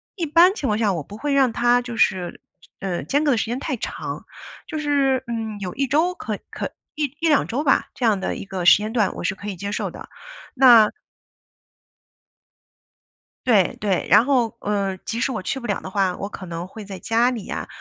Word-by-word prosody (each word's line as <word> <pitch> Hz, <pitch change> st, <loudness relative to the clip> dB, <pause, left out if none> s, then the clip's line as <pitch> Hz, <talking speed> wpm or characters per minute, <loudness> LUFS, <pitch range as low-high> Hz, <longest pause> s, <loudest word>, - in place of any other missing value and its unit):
一 350 Hz, -5 st, -2 dB
般 340 Hz, +5 st, +5 dB
情 295 Hz, -10 st, -3 dB
况 210 Hz, -, +1 dB
下， 215 Hz, -3 st, +2 dB
我 170 Hz, -, -3 dB
不 205 Hz, +9 st, -11 dB
会 290 Hz, +4 st, -1 dB
让 265 Hz, -4 st, +3 dB
它 240 Hz, +1 st, +3 dB
就 240 Hz, -1 st, -7 dB
是， 185 Hz, -5 st, 0 dB, 0.4 s
呃， 185 Hz, -3 st, -3 dB
间 285 Hz, +2 st, +1 dB
隔 295 Hz, -, +3 dB
的 245 Hz, -, +2 dB
时 -, -, 0 dB
间 235 Hz, +2 st, -3 dB
太 265 Hz, -1 st, -3 dB
长。 -, -, -5 dB, 0.4 s
就 315 Hz, -, -5 dB
是， 280 Hz, -3 st, +1 dB
嗯， 225 Hz, -2 st, -4 dB
有 180 Hz, -2 st, -4 dB
1 275 Hz, 0 st, 0 dB
周 320 Hz, +7 st, +2 dB
可- -, -, -5 dB
可 -, -, -4 dB, 0.2 s
1- 300 Hz, -1 st, 0 dB, 0.2 s
1-2 300 Hz, -3 st, +3 dB
周 260 Hz, +6 st, -2 dB
吧。 275 Hz, -, +2 dB
这 250 Hz, -, -2 dB
样 215 Hz, -4 st, +3 dB
的 190 Hz, -, -2 dB
一 -, -, -6 dB
个 190 Hz, -2 st, -5 dB
时 -, -, +9 dB
间 215 Hz, +1 st, -4 dB
段 220 Hz, -4 st, +1 dB
我 -, -, -6 dB
是 -, -, 0 dB
可 200 Hz, +2 st, -10 dB
以 200 Hz, -, -4 dB
接 200 Hz, +3 st, -5 dB
受 -, -, -2 dB
的， -, -, -11 dB, 0.4 s
那 240 Hz, -5 st, +7 dB, 2.6 s
对， 210 Hz, -7 st, +3 dB
对。 195 Hz, -3 st, 0 dB
然 225 Hz, -, +6 dB
后， 250 Hz, -5 st, +1 dB
呃， 200 Hz, -2 st, -1 dB
即 230 Hz, +1 st, -3 dB
使 265 Hz, -, +1 dB
我 225 Hz, -, -3 dB
去 225 Hz, +8 st, -3 dB
不 240 Hz, -, -9 dB
了 205 Hz, -, -1 dB
的 -, -, -7 dB
话， 190 Hz, -2 st, 0 dB
我 200 Hz, -, -5 dB
可 195 Hz, -, -8 dB
能 170 Hz, 0 st, -6 dB
会 215 Hz, +3 st, -10 dB
在 195 Hz, -1 st, -8 dB
家 235 Hz, +5 st, +2 dB
里 225 Hz, -6 st, -5 dB
呀， -, -, -5 dB
225 Hz, 220 characters per minute, -22 LUFS, 195-270 Hz, 2.6 s, 时